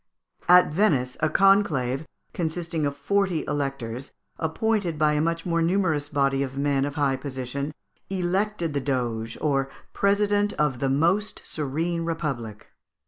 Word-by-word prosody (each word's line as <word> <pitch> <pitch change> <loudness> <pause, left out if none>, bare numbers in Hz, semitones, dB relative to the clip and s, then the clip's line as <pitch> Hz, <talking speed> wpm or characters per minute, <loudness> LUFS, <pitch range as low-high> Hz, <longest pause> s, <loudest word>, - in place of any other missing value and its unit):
At 180 -3 +7
Venice, 140 -10 +2
a 155 - +2
conclave, 160 -9 +3 0.3
consisting 165 -2 -2
of 140 - -4
forty 185 +3 0
electors, 135 -3 -3 0.3
appointed 180 +1 0
by 150 0 +3
a 150 - +1
much 165 +1 -1
more 170 -1 +1
numerous 165 -4 +1
body 140 -2 +1
of 135 -1 -3
men 140 -1 +1
of 145 0 -5
high 140 -3 +1
position, 135 +1 -4 0.4
elected 190 -2 -1
the 140 - 0
Doge, 120 -4 -2
or 135 -3 +1 0.2
president 205 +1 +2
of 145 -5 0
the 135 - 0
most 170 +10 +1
serene 165 +4 -2
Republic. 140 -10 -4
150 Hz, 140 wpm, -25 LUFS, 135-175 Hz, 0.4 s, At